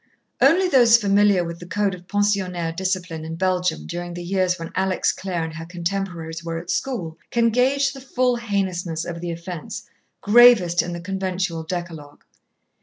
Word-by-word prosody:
Only 345 Hz, +7 st, +5 dB
those 240 Hz, -8 st, +6 dB
familiar 200 Hz, -3 st, +3 dB
with 170 Hz, 0 st, -6 dB
the 175 Hz, -, -10 dB
code 205 Hz, +1 st, 0 dB
of 180 Hz, 0 st, -11 dB
pensionnaire 190 Hz, -5 st, 0 dB
discipline 180 Hz, -3 st, -2 dB
in 160 Hz, +1 st, -5 dB
Belgium 180 Hz, -1 st, 0 dB
during 175 Hz, 0 st, -5 dB
the 175 Hz, -, -6 dB
years 185 Hz, 0 st, 0 dB
when 165 Hz, -1 st, -7 dB
Alex 190 Hz, 0 st, +1 dB
Clare 180 Hz, -3 st, -3 dB
and 160 Hz, 0 st, -5 dB
her 165 Hz, +1 st, -7 dB
contemporaries 170 Hz, -2 st, -4 dB
were 165 Hz, 0 st, -4 dB
at 170 Hz, +2 st, -5 dB
school, 180 Hz, -12 st, -3 dB
can 230 Hz, -1 st, +2 dB
gauge 270 Hz, +4 st, +2 dB
the 270 Hz, -, -10 dB
full 255 Hz, -1 st, +1 dB
heinousness 185 Hz, -7 st, -2 dB
of 170 Hz, -1 st, -6 dB
the 175 Hz, -, -4 dB
offence, 170 Hz, +5 st, -6 dB, 0.4 s
gravest 210 Hz, -6 st, +6 dB
in 175 Hz, -, -5 dB
the 170 Hz, -, -6 dB
conventual 185 Hz, -2 st, -2 dB
decalogue. 160 Hz, -3 st, -7 dB
180 Hz, 170 wpm, -22 LUFS, 170-205 Hz, 0.4 s, those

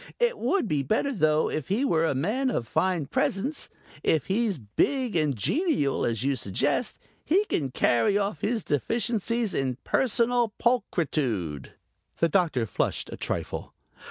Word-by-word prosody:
It 485 Hz, 0 st, +1 dB
would 385 Hz, -, +1 dB
be 150 Hz, -6 st, +1 dB
better 220 Hz, -, 0 dB
though 155 Hz, -6 st, +2 dB
if 155 Hz, -, -3 dB
he 220 Hz, +9 st, +1 dB
were 165 Hz, -9 st, +2 dB
a 140 Hz, -, 0 dB
man 220 Hz, -, 0 dB
of 115 Hz, -, -2 dB
fine 180 Hz, -1 st, 0 dB
presence. 245 Hz, -, -1 dB, 0.3 s
If 155 Hz, -4 st, +1 dB
he's 205 Hz, -1 st, 0 dB
big 235 Hz, -, 0 dB
and 150 Hz, -4 st, +2 dB
genial, 145 Hz, -, +1 dB
as 115 Hz, -1 st, -1 dB
you 140 Hz, 0 st, +1 dB
suggest, 135 Hz, -, -1 dB, 0.3 s
he 390 Hz, +6 st, +2 dB
can 140 Hz, -, -1 dB
carry 125 Hz, -, +2 dB
off 205 Hz, +1 st, -2 dB
his 225 Hz, 0 st, 0 dB
deficiencies 230 Hz, -, 0 dB
in 130 Hz, -2 st, -1 dB
personal 240 Hz, -2 st, +2 dB
pulchritude." 135 Hz, -, -1 dB, 0.4 s
The 165 Hz, -, +2 dB
Doctor 160 Hz, -9 st, +2 dB
flushed -, -, -2 dB
a -, -, -5 dB
trifle. -, -, -4 dB
185 Hz, 150 wpm, -27 LUFS, -, 0.4 s, though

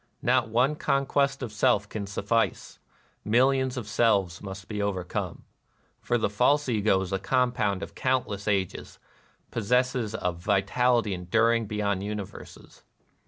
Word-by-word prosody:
Not 125 Hz, -1 st, +2 dB
one 125 Hz, +6 st, +2 dB
conquest 140 Hz, -1 st, +1 dB
of 120 Hz, -, -5 dB
self 105 Hz, -1 st, +2 dB
can 105 Hz, -1 st, -5 dB
suffice: 100 Hz, +3 st, -1 dB, 0.4 s
millions 130 Hz, +3 st, +2 dB
of 115 Hz, -4 st, -5 dB
selves 100 Hz, -6 st, +1 dB
must 95 Hz, -1 st, -8 dB
be 105 Hz, -1 st, -3 dB
overcome. 95 Hz, -3 st, -3 dB, 0.6 s
For 120 Hz, -, +1 dB
the 115 Hz, -, +1 dB
false 125 Hz, +8 st, +2 dB
Ego 105 Hz, -5 st, +2 dB
is 95 Hz, 0 st, -4 dB
a 95 Hz, -, 0 dB
compound 120 Hz, -3 st, 0 dB
of -, -, -8 dB
countless 125 Hz, -6 st, -1 dB
ages, 95 Hz, -3 st, -2 dB, 0.3 s
— -, -, -37 dB
possesses 125 Hz, 0 st, 0 dB
a 90 Hz, -, 0 dB
vitality 100 Hz, +5 st, +1 dB
enduring 115 Hz, +5 st, +1 dB
beyond 100 Hz, -2 st, -1 dB
universes. 105 Hz, -1 st, -8 dB
105 Hz, 135 wpm, -27 LUFS, 100-125 Hz, 0.6 s, Not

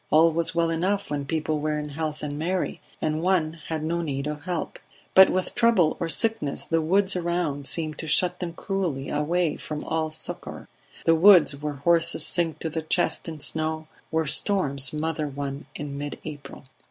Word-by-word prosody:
All 165 Hz, +2 st, +5 dB
was 165 Hz, +1 st, 0 dB
well 165 Hz, -1 st, +2 dB
enough 190 Hz, +4 st, -1 dB
when 145 Hz, -1 st, -2 dB
people 155 Hz, +1 st, -1 dB
were 155 Hz, +1 st, -1 dB
in 150 Hz, 0 st, -4 dB
health 155 Hz, +1 st, -4 dB
and 145 Hz, -1 st, -3 dB
merry, 180 Hz, +3 st, -2 dB, 0.2 s
and 155 Hz, 0 st, 0 dB
one 165 Hz, -3 st, +1 dB
had 160 Hz, -2 st, -3 dB
no 170 Hz, +2 st, -1 dB
need 140 Hz, -4 st, -3 dB
of 150 Hz, +1 st, -5 dB
help; 180 Hz, -3 st, -4 dB, 0.3 s
but 190 Hz, 0 st, +8 dB
with 185 Hz, 0 st, -1 dB
trouble 230 Hz, -9 st, +3 dB
or 165 Hz, -, -2 dB
sickness 220 Hz, -7 st, +2 dB
the 165 Hz, 0 st, 0 dB
woods 190 Hz, +4 st, +2 dB
around 170 Hz, -5 st, -1 dB
seemed 155 Hz, -3 st, +1 dB
to 160 Hz, -, -4 dB
shut 180 Hz, +3 st, +2 dB
them 175 Hz, -2 st, -4 dB
cruelly 175 Hz, -8 st, -3 dB
away 160 Hz, +2 st, 0 dB
from 150 Hz, -1 st, -6 dB
all 160 Hz, -1 st, -1 dB
succour 155 Hz, -, -8 dB, 0.4 s
the 165 Hz, -, +5 dB
woods 170 Hz, -3 st, +6 dB
where 145 Hz, +1 st, -4 dB
horses 165 Hz, +4 st, +3 dB
sink 165 Hz, -3 st, +2 dB
to 160 Hz, -, -2 dB
the 160 Hz, -, -2 dB
chest 160 Hz, +1 st, 0 dB
in 155 Hz, -2 st, -8 dB
snow, 155 Hz, +1 st, 0 dB, 0.2 s
where 160 Hz, 0 st, 0 dB
storms 140 Hz, -5 st, +1 dB
smother 155 Hz, +1 st, -1 dB
one 140 Hz, 0 st, -6 dB
in 145 Hz, -1 st, -6 dB
mid 145 Hz, 0 st, -5 dB
April. 145 Hz, -3 st, -9 dB
160 Hz, 185 wpm, -25 LUFS, 150-170 Hz, 0.4 s, but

